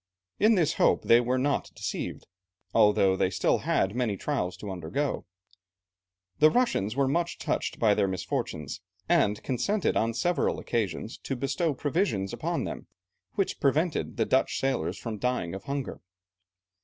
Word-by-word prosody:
In 220 Hz, +2 st, +5 dB
this 165 Hz, -5 st, +2 dB
hope -, -, +4 dB
they 115 Hz, +1 st, +6 dB
were 125 Hz, +2 st, 0 dB
not 140 Hz, +2 st, 0 dB
deceived, -, -, -4 dB, 0.5 s
although 105 Hz, -3 st, +4 dB
they -, -, +2 dB
had 95 Hz, -, -6 dB
still 90 Hz, -, +2 dB, 0.3 s
many 120 Hz, -5 st, -1 dB
trials 90 Hz, -12 st, -2 dB
to 100 Hz, +1 st, -6 dB
undergo. 95 Hz, -, -2 dB, 1.1 s
The 155 Hz, -, +7 dB
Russians 235 Hz, -, +1 dB
were 140 Hz, -1 st, +2 dB
much 170 Hz, +5 st, 0 dB
touched -, -, -2 dB
by 110 Hz, -3 st, +4 dB
their 100 Hz, -, +2 dB
misfortunes, 80 Hz, -5 st, -3 dB, 0.3 s
and 105 Hz, +1 st, +2 dB
consented 155 Hz, -, 0 dB
on 115 Hz, +1 st, +1 dB
several 175 Hz, +7 st, +1 dB
occasions 110 Hz, 0 st, -3 dB
to 135 Hz, -, -4 dB
bestow 140 Hz, +4 st, -1 dB
provisions 140 Hz, -, 0 dB
upon -, -, -2 dB
them, -, -, -6 dB, 0.5 s
which 195 Hz, -, -1 dB
prevented 150 Hz, +4 st, +1 dB
the -, -, +2 dB
Dutch 130 Hz, -, +1 dB
sailors 135 Hz, -1 st, -1 dB
from 110 Hz, -3 st, -5 dB
dying 125 Hz, -9 st, -1 dB
of 95 Hz, 0 st, -7 dB
hunger. 140 Hz, -1 st, -4 dB
125 Hz, 150 wpm, -28 LUFS, 100-145 Hz, 1.1 s, The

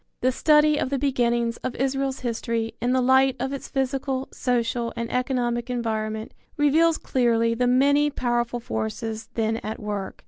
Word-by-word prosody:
The 255 Hz, -, +3 dB
study 300 Hz, +2 st, +4 dB
of -, -, -1 dB
the 280 Hz, -, 0 dB
beginnings 240 Hz, -4 st, 0 dB
of 255 Hz, -, -5 dB
Israel's 270 Hz, +1 st, -1 dB
history 230 Hz, -1 st, -2 dB
in 245 Hz, +2 st, +1 dB
the 260 Hz, 0 st, +2 dB
light 265 Hz, +1 st, +4 dB
of 265 Hz, +2 st, -2 dB
its 275 Hz, -, -6 dB
physical, 265 Hz, 0 st, -2 dB
social 235 Hz, -1 st, -1 dB
and 235 Hz, 0 st, -4 dB
economic 245 Hz, -1 st, -1 dB
environment 220 Hz, -2 st, -3 dB, 0.2 s
reveals 315 Hz, +3 st, +4 dB
clearly 230 Hz, -2 st, +1 dB
the 245 Hz, +2 st, +1 dB
many 285 Hz, +4 st, +4 dB
powerful 240 Hz, -3 st, -1 dB
forces 220 Hz, -, -4 dB
then 225 Hz, 0 st, 0 dB
at 220 Hz, -1 st, -5 dB
work. 205 Hz, -2 st, -5 dB
245 Hz, 160 wpm, -24 LUFS, 230-270 Hz, 0.2 s, study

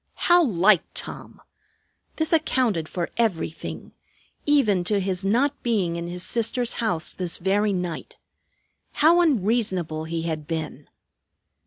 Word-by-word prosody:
How 350 Hz, 0 st, +4 dB
like 195 Hz, -, +4 dB
Tom! -, -, -6 dB, 0.8 s
This 315 Hz, +1 st, -1 dB
accounted 250 Hz, -, +1 dB
for 175 Hz, -2 st, -3 dB
everything, 185 Hz, -8 st, -2 dB, 0.6 s
even 225 Hz, -11 st, +3 dB
to 205 Hz, +1 st, +2 dB
his 190 Hz, -1 st, -2 dB
not 255 Hz, +8 st, +1 dB
being 200 Hz, -8 st, 0 dB
in 170 Hz, 0 st, -4 dB
his 180 Hz, +1 st, -5 dB
sister's 240 Hz, +1 st, 0 dB
house 175 Hz, -8 st, -1 dB
this 180 Hz, -2 st, -3 dB
very 205 Hz, +3 st, +1 dB
night. 180 Hz, -4 st, -4 dB, 0.8 s
How 335 Hz, +4 st, +5 dB
unreasonable 200 Hz, -, 0 dB
he 165 Hz, 0 st, -3 dB
had 155 Hz, -3 st, -4 dB
been! 160 Hz, -3 st, -5 dB
195 Hz, 125 wpm, -24 LUFS, 170-240 Hz, 0.8 s, How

